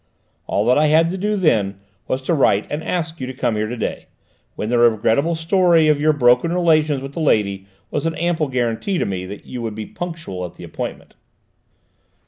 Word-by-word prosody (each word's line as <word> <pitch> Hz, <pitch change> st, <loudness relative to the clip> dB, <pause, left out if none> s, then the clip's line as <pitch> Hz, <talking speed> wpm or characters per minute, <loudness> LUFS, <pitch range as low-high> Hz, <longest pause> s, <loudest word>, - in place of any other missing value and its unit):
All -, -, 0 dB
I 150 Hz, +4 st, +4 dB
had 160 Hz, +2 st, +4 dB
to 185 Hz, -, -3 dB
do 210 Hz, +2 st, 0 dB
then 105 Hz, -, +1 dB, 0.3 s
was 130 Hz, +1 st, -2 dB
to 170 Hz, -, 0 dB
write 110 Hz, -9 st, +3 dB
and 150 Hz, +2 st, -3 dB
ask 165 Hz, -3 st, -3 dB
you 130 Hz, -, -3 dB
to 130 Hz, -, -7 dB
come 120 Hz, -3 st, 0 dB
here 105 Hz, 0 st, -1 dB
to 120 Hz, +2 st, -5 dB
day; 115 Hz, -, -4 dB, 0.5 s
and 110 Hz, -, -3 dB
the 120 Hz, -, +3 dB
regrettable 120 Hz, +7 st, +3 dB
story 165 Hz, -1 st, +3 dB
of 150 Hz, -1 st, +3 dB
your 155 Hz, +1 st, +4 dB
broken 125 Hz, +2 st, +3 dB
relations 155 Hz, -5 st, +2 dB
with 135 Hz, 0 st, -7 dB
the -, -, -5 dB
lady 100 Hz, -10 st, +1 dB, 0.2 s
was -, -, -1 dB
an 165 Hz, -, -2 dB
ample 165 Hz, -2 st, 0 dB
guarantee 125 Hz, -, -1 dB
to -, -, 0 dB
me 95 Hz, -2 st, -4 dB
that 100 Hz, +2 st, -9 dB
you 125 Hz, -, -6 dB
would 110 Hz, -2 st, -4 dB
be 110 Hz, 0 st, -5 dB
punctual 165 Hz, -, -6 dB
at 90 Hz, -, -7 dB
the -, -, -11 dB
appointment!" -, -, -7 dB
140 Hz, 205 wpm, -20 LUFS, 110-165 Hz, 0.5 s, I